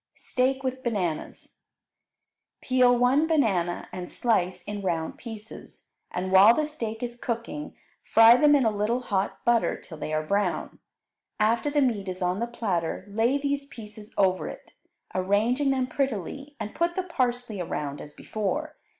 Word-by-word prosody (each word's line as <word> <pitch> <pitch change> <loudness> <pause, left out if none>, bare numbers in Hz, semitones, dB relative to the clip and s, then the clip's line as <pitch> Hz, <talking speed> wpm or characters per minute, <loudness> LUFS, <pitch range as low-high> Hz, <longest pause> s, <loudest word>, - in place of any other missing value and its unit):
Steak 265 +1 0
with 260 0 -2
Bananas 195 - -3 1.0
Peel 250 -1 +4
one 260 +6 +3
banana 195 - +1
and 180 -1 -6
slice 185 -7 0
in 205 -1 -5
round 165 -4 -2
pieces, 225 -2 -10 0.2
and 185 +1 -3
while 200 +5 +8
the 305 - +1
steak 230 -7 -5
is 240 -1 -4
cooking 240 +5 -5 0.3
fry 225 +1 +7
them 295 +3 +5
in 270 -4 +3
a 220 - +3
little 220 +5 0
hot 200 -5 -2
butter 235 -1 +2
till 160 -3 -11
they 155 - -4
are 155 0 -1
brown. 200 +1 -1 0.6
After 230 +6 +2
the 290 -1 +2
meat 210 -7 0
is 185 0 -5
on 180 +2 0
the 235 - -1
platter, 190 -8 -2
lay 230 +6 +2
these 280 0 -2
pieces 215 -3 -11
over 190 -2 +2
it, - - -10 0.4
arranging 215 +9 +1
them 260 -1 +1
prettily, 275 - -3
and 210 - -5
put 340 +1 0
the 375 - -1
parsley 245 - -2
around 145 -4 -4
as 150 - -10
before. 255 - -3
230 Hz, 160 wpm, -26 LUFS, 195-260 Hz, 1.0 s, while